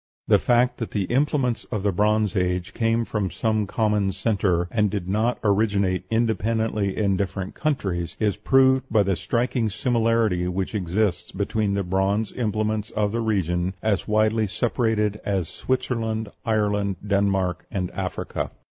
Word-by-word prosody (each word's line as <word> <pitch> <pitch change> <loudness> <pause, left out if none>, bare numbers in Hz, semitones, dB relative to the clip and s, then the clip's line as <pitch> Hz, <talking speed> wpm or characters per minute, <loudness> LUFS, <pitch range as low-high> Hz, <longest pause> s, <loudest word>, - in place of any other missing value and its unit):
The - - +5
fact 120 +1 +2
that 115 - -4
the 100 - -1
implements 130 +1 0
of 105 -5 -4
the 100 - +2
Bronze 105 +2 +1
Age 90 -1 -1
came 115 0 +1
from 105 -4 -2
some 110 +4 0
common 105 -2 +1
centre, 95 -3 0
and 105 -2 +2
did 95 -3 -3
not 110 +5 +1
originate 100 -3 +1
independently 110 -3 0
in 100 -3 +2
different 95 0 -3
countries, 95 - -2
is 105 -3 +1
proved 130 0 +3
by 110 -2 +4
the 95 -1 +1
striking 120 +2 0
similarity 115 -5 +1
which 95 +3 -2
exists 95 0 -1
between 100 +1 -1
the 100 - 0
bronze 95 +4 0
implements 110 -2 -1
of 105 -1 -1
regions 95 -5 0
as 110 -3 0
widely 110 0 +2
separated 105 -1 0
as 95 -5 -1
Switzerland, 115 -4 -2 0.2
Ireland, 105 -2 +1
Denmark, 100 -3 0
and 90 -3 -3
Africa. - - -3
105 Hz, 145 wpm, -24 LUFS, 95-115 Hz, 0.2 s, The